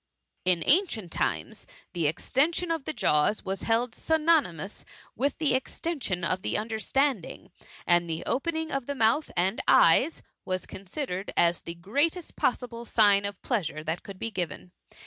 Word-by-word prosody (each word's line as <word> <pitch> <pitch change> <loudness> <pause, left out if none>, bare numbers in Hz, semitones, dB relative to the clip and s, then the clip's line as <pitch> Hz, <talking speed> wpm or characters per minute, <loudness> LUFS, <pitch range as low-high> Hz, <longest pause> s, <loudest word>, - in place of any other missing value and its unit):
In 180 -2 +3
ancient 275 - +3
times, 80 -4 -2 0.3
the 170 -3 0
extension 310 - 0
of 325 -4 -2
the - - -1
jaws 150 - +1
was 195 0 -2
held 230 +1 0
synonymous 305 - +1 0.3
with 275 +4 -1
the 305 -5 +1
extension 260 - -2
of 185 +2 0
the - - 0
understanding, 225 - -1 0.3
and 175 -1 +3
the 160 0 -3
opening 320 +3 -1
of 275 -3 -3
the 285 - -3
mouth 230 +5 +2
and 190 +5 +1
eyes 260 - +5 0.2
was 185 0 -3
consi 200 +10 -6
dered 185 +3 -4
as 170 0 +3
the 170 - -7
greatest 285 - -1
possible 240 -2 -1
sign 205 -4 +4
of 200 -2 -4
pleasure 165 - -2
that 160 +3 -3
could 200 -2 -10
be 230 +4 -4
given. 180 -2 -5
220 Hz, 155 wpm, -27 LUFS, 180-285 Hz, 0.3 s, eyes